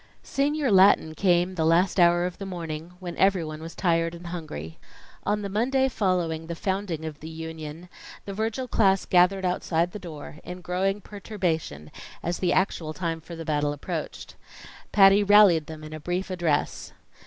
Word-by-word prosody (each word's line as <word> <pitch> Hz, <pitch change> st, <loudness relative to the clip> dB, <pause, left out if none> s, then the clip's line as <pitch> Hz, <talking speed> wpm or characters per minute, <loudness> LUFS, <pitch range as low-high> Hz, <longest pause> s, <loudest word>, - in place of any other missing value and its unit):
Senior 285 Hz, -1 st, 0 dB
Latin 190 Hz, -4 st, +5 dB
came 180 Hz, +1 st, +2 dB
the 165 Hz, -3 st, -1 dB
last 175 Hz, +4 st, +3 dB
hour 175 Hz, 0 st, +5 dB
of 180 Hz, -, -5 dB
the 195 Hz, -, -5 dB
morning, 165 Hz, -2 st, -6 dB
when 175 Hz, -2 st, -6 dB
everyone 165 Hz, -6 st, +1 dB
was 165 Hz, +1 st, -8 dB
tired 165 Hz, -2 st, +1 dB
and 170 Hz, +1 st, -11 dB
hungry. 155 Hz, -, -7 dB, 0.5 s
On 205 Hz, +1 st, 0 dB
the -, -, -2 dB
Monday 255 Hz, +7 st, +1 dB
following 180 Hz, -8 st, -1 dB
the 170 Hz, -, -4 dB
founding 190 Hz, -3 st, -3 dB
of 155 Hz, -2 st, -6 dB
the 160 Hz, -, -8 dB
Union, 160 Hz, 0 st, -7 dB, 0.4 s
the 200 Hz, -, -5 dB
Virgil 225 Hz, +5 st, -2 dB
class 195 Hz, -5 st, +2 dB
gathered 185 Hz, +1 st, +3 dB
outside 175 Hz, -1 st, 0 dB
the 210 Hz, -, -7 dB
door, 155 Hz, -5 st, -9 dB
in 180 Hz, 0 st, -8 dB
growing 190 Hz, +4 st, -1 dB
perturbation 180 Hz, -, -4 dB, 0.3 s
as 175 Hz, +1 st, -2 dB
the 180 Hz, -, +1 dB
actual 165 Hz, -4 st, 0 dB
time 165 Hz, -3 st, -3 dB
for 170 Hz, +2 st, -9 dB
the 165 Hz, 0 st, -7 dB
battle 145 Hz, -1 st, 0 dB
approached. 145 Hz, -, -6 dB, 0.6 s
Patty 195 Hz, 0 st, +6 dB
rallied 200 Hz, -6 st, +6 dB
them 155 Hz, -1 st, -9 dB
in 155 Hz, 0 st, -9 dB
a 155 Hz, -, -6 dB
brief 180 Hz, +4 st, -3 dB
address. 170 Hz, -5 st, -1 dB
175 Hz, 170 wpm, -26 LUFS, 160-195 Hz, 0.6 s, Patty